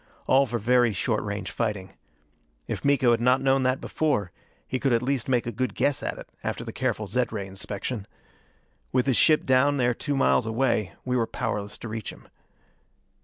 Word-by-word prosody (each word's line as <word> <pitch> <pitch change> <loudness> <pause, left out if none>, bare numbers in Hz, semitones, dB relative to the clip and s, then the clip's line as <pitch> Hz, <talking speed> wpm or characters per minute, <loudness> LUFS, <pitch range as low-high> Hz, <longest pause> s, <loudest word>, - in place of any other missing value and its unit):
All 135 +1 +4
for 120 0 -2
very 120 +1 +3
short 105 +3 0
range 100 -3 -4
fighting. 105 -5 -3 0.7
If - - -4
Miko 135 -4 +4
had 115 0 +2
not 125 +2 +4
known 135 0 +2
that 130 +1 +1
before, 130 - -1 0.4
he 130 - -2
could 135 -2 +1
at 115 +1 +2
least 135 -1 -1
make 125 -2 +2
a 120 - -2
good 125 +3 -2
guess 145 -1 +1
at - - -3
it - - -9 0.2
after - - -3
the - - -7
careful - - -1
zed 125 0 -1
ray 100 -3 -3
inspection. 100 +3 -5 0.8
With 125 -1 +2
his 135 -3 +2
ship 155 -2 +4
down 135 +2 +3
there 125 -2 +2
two 145 +3 -2
miles 125 -3 +3
away, 110 -4 0
we 125 0 0
were 115 -2 +1
powerless 105 -3 -3
to - - -8
reach 110 -1 -5
him. - - -16
120 Hz, 195 wpm, -26 LUFS, 110-130 Hz, 0.8 s, All